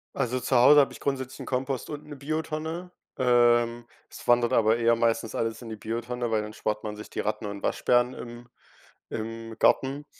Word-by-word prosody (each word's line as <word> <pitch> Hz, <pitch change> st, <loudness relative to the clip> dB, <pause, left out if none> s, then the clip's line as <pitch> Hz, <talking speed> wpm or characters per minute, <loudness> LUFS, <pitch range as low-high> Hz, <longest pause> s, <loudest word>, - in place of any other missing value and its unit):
Also 130 Hz, -1 st, 0 dB
zu 130 Hz, -, -1 dB
Hause 135 Hz, +5 st, +8 dB
habe 140 Hz, -, +3 dB
ich -, -, -12 dB
grundsätzlich 130 Hz, -1 st, -3 dB
'n -, -, -6 dB
Kompost 130 Hz, 0 st, -2 dB
und 150 Hz, -1 st, -7 dB
'ne 145 Hz, -, -8 dB
Biotonne. 160 Hz, +4 st, -4 dB, 0.3 s
Ähm, 120 Hz, -1 st, +3 dB, 0.2 s
es -, -, -11 dB
wandert 120 Hz, -1 st, +4 dB
aber 110 Hz, 0 st, +4 dB
eher 115 Hz, 0 st, +3 dB
meistens 115 Hz, -1 st, 0 dB
alles 115 Hz, +1 st, -2 dB
in 120 Hz, -, -9 dB
die 110 Hz, -, -5 dB
Biotonne, 120 Hz, +2 st, -4 dB
weil 110 Hz, -, +2 dB
dann 105 Hz, 0 st, -7 dB
spart 105 Hz, 0 st, -3 dB
man 105 Hz, 0 st, -4 dB
sich 105 Hz, -, -10 dB
die -, -, -6 dB
Ratten 105 Hz, +1 st, -2 dB
und 100 Hz, -1 st, -5 dB
Waschbären 120 Hz, +1 st, +2 dB
im 120 Hz, 0 st, -9 dB, 0.6 s
im 115 Hz, 0 st, -6 dB
Garten. 140 Hz, +2 st, +2 dB
120 Hz, 195 wpm, -27 LUFS, 115-130 Hz, 0.6 s, Hause